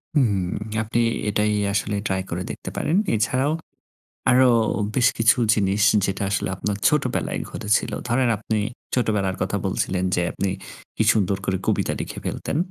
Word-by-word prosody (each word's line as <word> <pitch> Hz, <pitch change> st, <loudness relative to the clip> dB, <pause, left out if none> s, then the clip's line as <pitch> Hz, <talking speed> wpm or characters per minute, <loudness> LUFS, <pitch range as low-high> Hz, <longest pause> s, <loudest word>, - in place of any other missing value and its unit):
হুম 130 Hz, -8 st, +4 dB, 0.5 s
আপনি 115 Hz, +2 st, -1 dB, 0.3 s
এটাই 105 Hz, +1 st, +1 dB, 0.2 s
আসলে 105 Hz, 0 st, 0 dB
ট্রাই 95 Hz, 0 st, 0 dB
করে 90 Hz, +2 st, -3 dB
দেখতে -, -, -7 dB
পারেন। 160 Hz, -, 0 dB, 0.2 s
এছাড়াও 130 Hz, +6 st, +1 dB, 0.8 s
আরো 130 Hz, 0 st, +6 dB, 0.5 s
বেশ 125 Hz, -2 st, +4 dB
কিছু 115 Hz, +2 st, +4 dB, 0.2 s
জিনিস 100 Hz, 0 st, +1 dB, 0.2 s
যেটা 95 Hz, +1 st, -2 dB
আসলে 100 Hz, -, 0 dB
আপনার 100 Hz, +1 st, -2 dB
ছোটবেলায় 145 Hz, -4 st, 0 dB
ঘটেছিল। 105 Hz, 0 st, 0 dB, 0.2 s
ধরেন 125 Hz, +1 st, +2 dB
আপনি 110 Hz, 0 st, -2 dB, 0.4 s
ছোটবেলার 105 Hz, -6 st, +1 dB
কথা -, -, 0 dB
বলছিলেন 90 Hz, -1 st, -1 dB
যে 90 Hz, -, +1 dB
আপনি 100 Hz, -, -2 dB, 0.5 s
কি -, -, +2 dB
সুন্দর 100 Hz, -2 st, +1 dB
করে 95 Hz, -1 st, 0 dB
কবিতা -, -, +1 dB
লিখে -, -, -5 dB
ফেলতেন। 145 Hz, -, -3 dB
105 Hz, 145 wpm, -23 LUFS, 95-125 Hz, 0.8 s, আরো